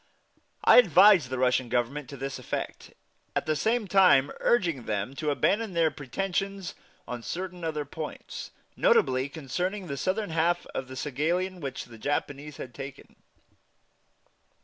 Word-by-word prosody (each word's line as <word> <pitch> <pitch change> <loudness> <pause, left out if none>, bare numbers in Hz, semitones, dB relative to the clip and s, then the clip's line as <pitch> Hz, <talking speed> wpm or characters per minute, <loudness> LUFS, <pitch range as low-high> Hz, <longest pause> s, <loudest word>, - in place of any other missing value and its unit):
I - - +7
advised 190 - +6
the 130 - -3
Russian 125 -1 +2
Government 130 +4 -1
to 140 - -8
this 135 +1 -4
effect, - - -5 0.4
at - - 0
the 155 - +1
same 220 +6 0
time 180 -8 +5
urging 170 - +1
them 105 +4 -2
to 155 - -1
abandon 205 +8 +1
their 165 -2 +3
pretensions 195 +6 -3 0.3
on 125 -1 -5
certain 180 +5 -5
other 155 -2 -2
points, 155 +2 -7 0.3
notably 130 +1 +3
concerning 175 +8 -3
the 140 -4 -5
southern 190 +4 -1
half 170 +2 +1
of 130 - -4
Saghalien, 160 +8 -2
which 135 -5 -5
the 115 -2 -13
Japanese 145 +2 -3
had 120 - -8
taken. 135 -1 -9
150 Hz, 140 wpm, -28 LUFS, 135-185 Hz, 0.4 s, I